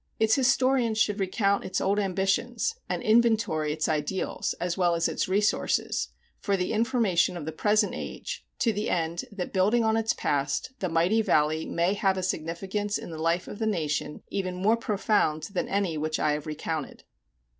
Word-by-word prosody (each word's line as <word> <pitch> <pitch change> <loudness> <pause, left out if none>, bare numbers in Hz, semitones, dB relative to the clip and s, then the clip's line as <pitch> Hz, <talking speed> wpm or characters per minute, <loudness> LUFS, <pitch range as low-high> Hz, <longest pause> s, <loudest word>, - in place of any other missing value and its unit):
Its 220 0 +3
historians 255 -3 +3
should 210 -1 +1
recount 200 +1 +1
its 185 - -2
old 200 +2 +1
ambitions, 195 - 0 0.2
and - - -2
inventory 220 -9 +3
its 155 0 -1
ideals, 155 +4 -1
as 175 -1 -1
well 175 -2 +2
as 165 0 +1
its - - -1
resources, 205 +3 +1 0.3
for 200 -2 0
the 180 +2 -1
information 220 -7 +2
of 160 - -6
the 160 - -3
present 210 +6 +2
age, - - -6
to 230 - +1
the 210 +1 -2
end 170 +1 -1
that 195 -3 -5
building 210 +5 +3
on 220 0 +2
its 225 0 +1
past, 145 - -1
the 185 - -1
mighty 175 +7 +3
Valley 155 -4 +1
may 170 +3 +1
have 195 -2 +1
a 185 - -2
significance 190 +4 -2
in - - -8
the 160 -1 -6
life 170 +2 +1
of 205 - -8
the 220 - 0
nation 150 -6 -2
even 185 -2 -2
more 200 +5 +3
profound 205 -8 0
than 185 - -1
any 190 -6 0
which 155 +1 -1
I 150 - +2
have 150 +1 -3
recounted. 155 -1 -4
190 Hz, 180 wpm, -27 LUFS, 165-215 Hz, 0.3 s, Its